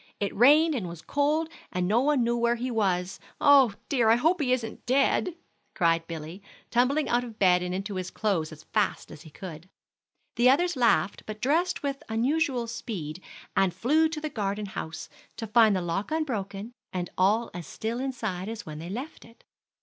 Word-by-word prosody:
It 200 - -2
rained 300 +8 +6
and 220 -10 -3
was 170 -1 -10
cold, 300 +3 +1 0.2
and 180 0 -1
no 220 +5 +3
one 285 -2 +2
knew 235 0 +1
where 235 0 +2
he 250 +2 -3
was. 190 -5 0 0.2
Oh 275 -7 +6
dear, 240 -5 +2
I 225 - +7
hope 320 +8 +2
he 255 -3 +1
isn't 240 -3 -2
dead," 275 +6 +2 0.4
cried 165 -1 +2
Billy, 165 +3 -7 0.3
tumbling 265 +5 +2
out 240 +1 +1
of 230 -3 -9
bed 180 -3 +4
and 180 0 -3
into 195 +2 -3
his 185 -1 -4
clothes 185 -8 -1
as 155 0 -12
fast - - -1
as 150 - -11
he 160 - -13
could. 170 +1 -10 0.7
The 240 +2 +5
others 350 +6 +3
laughed, 220 -8 +2
but 215 0 -6
dressed 320 +10 +1
with 275 -1 -2
unusual 250 +2 +1
speed, 205 -9 -6 0.3
and 190 -2 +2
flew 315 +6 +3
to 315 -1 -4
the 310 - -3
garden 205 -2 -2
house, 180 -5 -6 0.3
to 225 - -4
find 220 -1 +5
the 185 - 0
lock 175 +4 -2
unbroken, 225 -9 -3 0.2
and 180 -1 -4
all 210 +5 +2
as 175 -3 -7
still 230 +2 -4
inside 220 -8 -3
as 225 -1 -6
when 155 -1 -7
they 165 +2 -7
left 255 +10 -6
it. 230 0 -19
225 Hz, 190 wpm, -27 LUFS, 185-260 Hz, 0.7 s, I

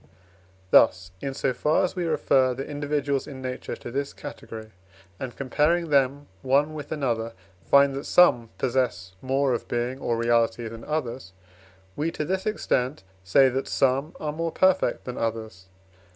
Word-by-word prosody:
Thus, 95 0 +5
in 135 -1 -4
so 135 -1 0
far 150 +7 +2
as 185 - -1
we 180 -2 -2
refer 135 -5 +2
the 135 +2 -5
individuals 145 -1 -1
in 135 -2 -8
nature 130 -1 -5
to 120 - -9
this 140 +2 -3
category, 110 -1 -9 0.5
and 130 -2 -6
comparing 155 +5 +1
them 140 +1 +2 0.2
one 140 +4 +2
with 150 -2 -8
another, 115 -6 -1 0.4
find 140 0 +6
that 140 +2 -5
some 120 -10 +5
possess 120 -8 -1
more 135 0 +1
of 120 - -3
being 120 +2 -2
or 120 -3 -1
reality 115 0 +1
than 115 0 -9
others, 130 -10 -4 0.6
we, 155 +3 -1
to 150 - -3
this 190 +4 -2
extent, 130 - -1 0.2
say 135 +9 +5
that 135 +2 -2
some 135 +4 +1
are 150 -1 -3
more 165 +1 -2
perfect 190 +2 +2
than 125 - -5
others. 110 -5 -4
135 Hz, 160 wpm, -25 LUFS, 120-150 Hz, 0.6 s, find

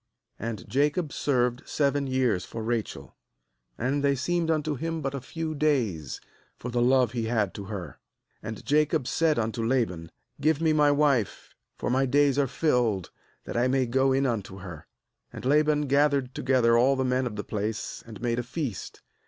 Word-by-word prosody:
20And 110 -4 -5
Jacob 150 +4 0
served 125 -3 +1
seven 140 -1 +1
years 125 -8 +1
for 115 - -6
Rachel; 110 - -3 0.6
and 140 +4 -1
they 140 -1 +3
seemed 165 +5 -1
unto 155 -1 +1
him 165 +4 -3
but 135 -2 -3
a 140 - -4
few 160 +4 -4
days, 120 - 0 0.4
for 125 - -6
the 120 0 +1
love 125 -1 +4
he 115 -2 -2
had 110 -4 0
to 100 - -7
her. 95 -7 -7 0.4
^And 110 -1 -6
Jacob 150 -1 +2
said 160 +3 +1
unto 115 0 -1
Laban: 115 -10 0 0.3
'Give 155 +1 +2
me 160 -1 +2
my 150 -1 +4
wife, 145 -7 +1 0.2
for - - -2
my 135 +1 +2
days 140 +1 +3
are 140 - +2
fulfilled, 120 - 0 0.3
that - - -7
I 120 +2 +2
may 130 0 +2
go 130 +3 +2
in 135 +1 +2
unto 105 -6 -2
her.' 90 -5 -9 0.4
^And - - -9
Laban 150 +2 +3
gathered 140 -2 +2
together 125 -3 +3
all 130 +4 +4
the 130 0 0
men 125 0 +1
of 110 - -6
the 105 - -4
place, 110 +1 -4
and 110 -2 -9
made 120 0 0
a - - -2
feast. 125 - -5
130 Hz, 180 wpm, -27 LUFS, 115-145 Hz, 0.6 s, love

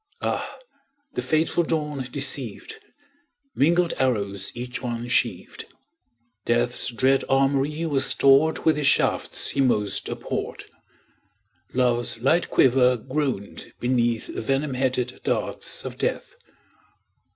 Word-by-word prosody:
Ah, - - -2 0.6
the - - -2
fateful 160 +2 +1
dawn 150 -4 -2
deceived! 445 - -4 0.7
Mingled 170 +4 +3
arrows 100 -7 -1
each 125 +1 -5
one 120 -2 -4
sheaved; - - -1 0.8
Death's 120 +2 0
dread 130 +2 +2
armoury 135 +4 +1
was 140 -4 +1
stored 140 +4 +4
With 160 -2 +4
the 150 - -1
shafts 135 - +1
he 140 - 0
most 105 -6 0
abhorred; - - -4 1.1
Love's 120 -2 +1
light 155 +8 +2
quiver 125 -1 +4
groaned 130 -4 -3
beneath 120 -2 +1
Venom 135 +4 -1
headed 125 -1 -1
darts - - -3
of - - -7
Death. - - -2
130 Hz, 105 wpm, -24 LUFS, 120-150 Hz, 1.1 s, stored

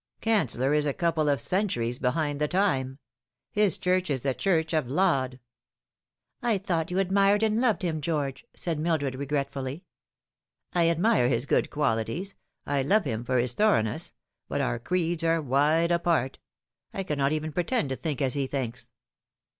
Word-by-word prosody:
Canceller 150 - +1
is 150 0 +2
a 140 - -1
couple 165 -3 +1
of 140 -2 +2
centuries 125 - 0
behind 145 +2 -1
the 150 - +2
time. 140 -8 0 0.5
His 210 -3 +2
Church 185 -1 0
is 135 -3 -1
the 135 0 0
Church 160 0 0
of 155 -6 0
Laud." 135 -5 +1 1.0
"I 235 -3 +1
thought 175 -4 -1
you 180 - -2
admired 195 +2 +3
and 220 +1 +2
loved 225 -6 +1
him, 160 -3 -1
George," 145 -4 -2
said 165 -3 -3
Mil 165 +1 +1
dred 140 -3 -3
regretfully. 140 +1 -3 0.9
"I 170 -1 +3
admire 170 - +3
his 125 0 0
good - - +1
qualities, 145 - -1 0.3
I 140 -1 0
love 200 +11 +3
him 110 +1 -2
for 130 +1 0
his 120 0 +1
thorough 210 - +3
ness; 115 +10 -2 0.4
but - - -2
our - - -1
creeds 170 +4 -1
are 165 0 +2
wide 150 +4 +2
apart. 170 -6 +1 0.6
I 195 - -2
cannot 140 -5 0
even 155 0 -2
pretend 180 - 0
to 130 - -1
think 140 +3 -3
as 130 - +1
he 140 -2 -1
thinks." 125 -4 -4
155 Hz, 170 wpm, -27 LUFS, 135-180 Hz, 1.0 s, admired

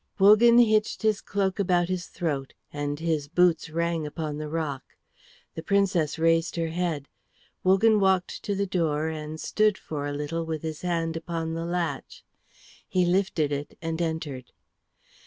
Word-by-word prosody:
Wogan 215 +4 +7
hitched 215 -3 +3
his 215 -2 +2
cloak 195 -1 -1
about 175 -3 +2
his 180 -1 -3
throat, 140 -6 -3 0.2
and 145 0 -3
his 160 -3 -1
boots 170 0 +2
rang 165 -1 -1
upon 150 -1 -4
the 155 0 -5
rock. 150 -4 -2 0.7
The 160 - -6
Princess 185 -5 +1
raised 165 +1 +2
her 165 -1 -1
head; 165 -4 -2 0.6
Wogan 205 +4 +4
walked 190 -2 +1
to 200 - -1
the 200 +1 0
door 160 -4 0
and 155 0 -6
stood 215 +2 +2
for 145 -2 -5
a - - -3
little 150 +3 -3
with 160 -1 -4
his 155 -1 -5
hand 165 -2 -1
upon 165 0 -3
the 165 0 -3
latch. 175 0 -3 0.7
He 180 -1 +2
lifted 175 -5 +1
it 145 0 -4
and 165 0 -3
entered. 160 -6 -4
165 Hz, 155 wpm, -26 LUFS, 155-185 Hz, 0.7 s, Wogan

